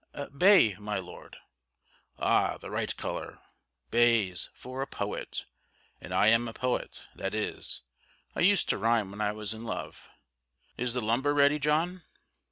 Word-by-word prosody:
"Bay, 180 - +6
my 105 0 -3
Lord." 95 - -9 0.8
"Ah! - - +2
the - - -9
right - - -2
colour, - - -5 0.5
Bays, 115 -7 +3
for 130 +1 -7
a 135 - -2
poet; 100 0 -4 0.6
and - - -9
I - - +3
am 115 +1 +3
a 115 - -6
poet: 125 +1 -2
that 95 +2 -4
is, 110 - -3 0.5
I - - -3
used 195 +1 +4
to - - +1
rhyme 110 -2 +2
when 100 +1 -6
I 105 -1 +1
was 105 0 -3
in 110 +1 -9
love. 115 - -6 0.7
Is 125 0 -2
the 125 - 0
lumber 130 +7 +1
ready, 145 +1 +4
John?" 160 +5 +1
115 Hz, 155 wpm, -29 LUFS, 105-140 Hz, 0.8 s, Bay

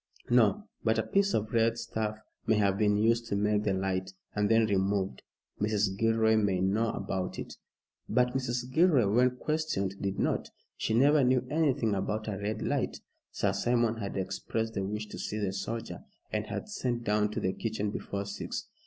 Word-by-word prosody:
"No. 125 - +4 0.2
But 110 -1 +2
a 110 - +2
piece 200 0 +2
of 110 +1 -2
red 115 0 +3
stuff 110 -2 -3 0.3
may 110 - +4
have 100 -2 +2
been 105 0 +2
used 115 +2 +2
to 100 - -1
make 105 +1 +2
the 105 -2 0
light, 95 0 -2 0.2
and 105 -1 +1
then 115 0 +5
removed." 95 -6 0 0.4
"Mrs. 105 -2 +1
Gilroy 110 +1 +3
may 100 -4 +2
know 105 +5 +1
about 95 -2 -3
it." - - -6 0.5
But 125 +2 +3
Mrs. 125 -1 -2
Gilroy, 155 - +5
when 125 +5 +3
questioned, 150 -12 -2
did 100 -1 -2
not. - - 0 0.3
She 110 - -1
never 145 +4 +5
knew 130 0 +3
anything 140 -8 +2
about 105 +3 -2
a 100 -3 -3
red 105 +1 -3
light. - - -1 0.3
Sir 100 -1 0
Simon 115 +2 +1
had 100 -3 -4
expressed 105 +4 -2
the 100 - -2
wish 105 +2 -3
to 105 - -9
see 105 - -3
the 100 -3 -1
soldier, 105 -1 -5 0.3
and - - -1
had - - -4
sent 120 -2 -2
down 105 -1 +2
to - - -1
the 95 - 0
kitchen 105 -2 -2
before 100 -1 -4
six. 100 +1 -5
110 Hz, 185 wpm, -30 LUFS, 100-120 Hz, 0.5 s, then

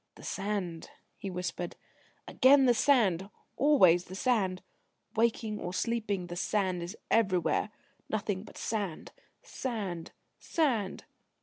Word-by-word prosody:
"The - - -14
sand," 195 -5 -3 0.3
he 195 - -6
whispered, 180 -1 -4 0.5
"again 270 +1 +6
the 245 - +6
sand; 210 -8 +3 0.3
always 185 - +5
the 185 - -9
sand. 195 -5 +1 0.5
Waking 220 -1 +1
or 180 +1 -4
sleeping, 210 -5 -1
the 175 0 -7
sand 185 0 0
is 175 +5 -6
everywhere 195 -2 +2 0.4
nothing 205 -3 -1
but - - -13
sand, 200 -7 -3 0.3
sand, 200 -10 -4 0.3
Sand...." 235 - 0
200 Hz, 115 wpm, -30 LUFS, 180-230 Hz, 0.5 s, again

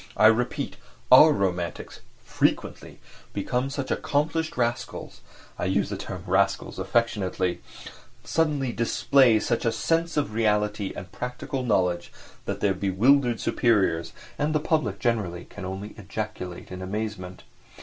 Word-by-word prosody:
I 105 - +5
repeat, 125 +6 +2 0.3
our 150 +5 +9
romantics, 90 - -2 0.3
frequently, - - -1 0.4
become 125 +6 -1
such 140 -1 -4
accomplished 155 +2 -1
rascals 120 -1 -3 0.4
(I - - -1
use 95 +2 +1
the - - -2
term - - -7
"rascals" - - +1
affectionately), 95 -6 0 0.6
suddenly 150 -6 0
display 120 0 +3
such 115 - -1
a 115 - +2
sense 165 +6 0
of 145 -7 0
reality 105 -2 +1
and - - -8
practical 125 +2 -4
knowledge 90 -7 0 0.3
that - - -4
their 100 -2 +3
bewildered 115 +7 +3
superiors 95 -9 +1 0.3
and 150 +1 0
the - - +4
public 150 - 0
generally 100 -7 -1
can 100 - -9
only 95 +3 -6
ejaculate 105 -4 -6
in 95 0 -6
amazement. 95 -2 -5
110 Hz, 130 wpm, -26 LUFS, 95-130 Hz, 0.6 s, our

